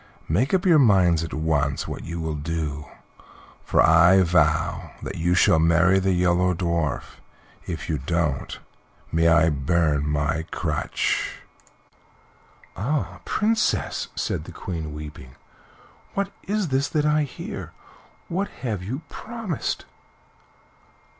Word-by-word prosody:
Make 105 - +1
up 190 0 +1
your 170 -4 +6
minds 90 - +4
at 80 - -5
once 75 -3 0
what - - -6
you 85 0 -5
will 80 -1 -2
do, 75 -1 -4 0.8
for - - +3
I 85 +4 +6
vow 85 +1 +1
that - - -4
you 85 +2 +2
shall 80 -2 +5
marry 85 +4 +4
the 95 0 +1
Yellow 90 0 +2
Dwarf. 85 -4 -2 0.5
If 85 -2 -5
you 75 -3 -1
don't, 75 -1 -1 0.5
may 80 +1 +3
I 85 -1 +5
burn 75 +1 +1
my 75 +2 -1
crutch!" 75 -4 -2 1.3
"Ah! 140 +8 -2
Princess," 220 +1 0
said - - -2
the - - -9
Queen, 80 -4 -5
weeping, 75 -4 -9 0.8
"what 200 0 -1 0.2
is 205 -4 0
this 135 +1 +1
that 150 -1 0
I 150 0 +3
hear? 145 -3 -6 0.6
What 190 +4 -1 0.2
have 110 -7 -2
you 130 - -5
promised?" 225 - -4
85 Hz, 125 wpm, -24 LUFS, 80-110 Hz, 1.3 s, your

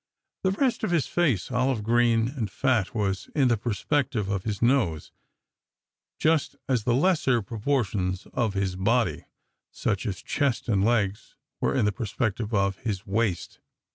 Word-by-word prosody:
The 190 - +3
rest 245 +6 0
of - - +1
his 170 -6 +2
face, 135 - 0
olive 125 -2 +1
green 115 0 +3
and 125 -7 -3
fat, 120 -6 0
was 95 -3 -1
in 135 -4 +4
the 120 - +4
perspective 115 0 -1
of 100 -2 -1
this 105 0 -3
nose, 115 - +1 1.1
just 155 -3 +1
as 125 -5 0
the 120 - +3
lesser 135 - +2
proportions 105 -5 -1
of 110 -5 0
his 95 -2 -1
body, 105 -2 +1 0.4
such 105 +1 -2
as 95 -4 -4
chest 140 -5 -1
and 100 -4 +2
legs, 105 -3 0 0.2
were - - 0
in - - +2
the 105 - +2
perspective 110 +1 -2
of 100 -2 +1
his 100 -3 -3
waist. 100 -3 -1
115 Hz, 155 wpm, -26 LUFS, 100-130 Hz, 1.1 s, in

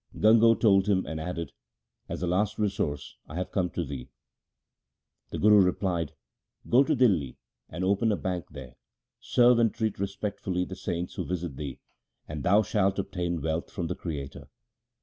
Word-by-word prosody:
Gango 115 +1 +6
told 100 -3 +4
him 95 -3 +2
and 80 - -5
added, 85 0 -4 0.3
' - - -50
As - - -4
a - - +2
last 100 +4 0
resource 95 -9 -2
I 75 - -9
have 90 +1 -3
come 90 -3 0
to 85 0 -3
thee.' 65 -3 -7 1.2
The - - -5
Guru 105 -1 +6
replied, 90 -4 0 0.3
' - - -26
Go 125 +4 +7
to 155 +2 +1
Dihli 90 - +2 0.3
and 90 +3 -4
open 100 +4 +2
a - - +2
bank 90 -2 -3
there, 65 -3 -11 0.4
serve 120 -1 +4
and 115 -1 +3
treat 110 -4 -2
respectfully 100 -2 -2
the 95 - -7
saints 90 -2 -4
who - - -3
visit 90 -5 -4
thee, 70 -2 -6 0.5
and 75 -1 -5
thou 100 +9 +4
shalt 100 -2 +1
obtain 85 -5 -2
wealth 80 +1 -2
from 90 - -4
the - - -3
Creator.' 70 -5 -6
90 Hz, 175 wpm, -28 LUFS, 80-105 Hz, 1.2 s, Go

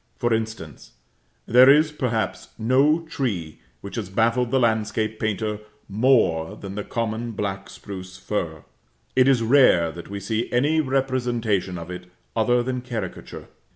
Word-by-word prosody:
For 120 -1 +1
instance: 110 - -5 0.5
there 125 +3 +7
is, 150 +2 +5
perhaps, 120 -7 -2
no 135 +8 +3
tree 100 - -3 0.2
which 100 - -8
has 105 -5 -4
baffled 115 +4 +1
the 130 - +2
landscape 110 -1 0
painter 105 0 -2 0.3
more 105 -6 +2
than 100 -2 -8
the 105 +1 -4
common 115 +1 -3
black 100 -2 -4
spruce 95 -2 -9
fir. 80 -8 -4 0.5
It 130 0 +5
is 130 -4 +3
rare 115 - +5
that 85 +1 -10
we 100 0 -5
see 110 +4 -2
any 145 +6 +2
representation 120 -8 -1
of 85 +1 -7
it 90 0 -8 0.3
other 120 +2 +2
than 125 0 -3
caricature. 120 -3 -6
110 Hz, 145 wpm, -23 LUFS, 100-125 Hz, 0.5 s, there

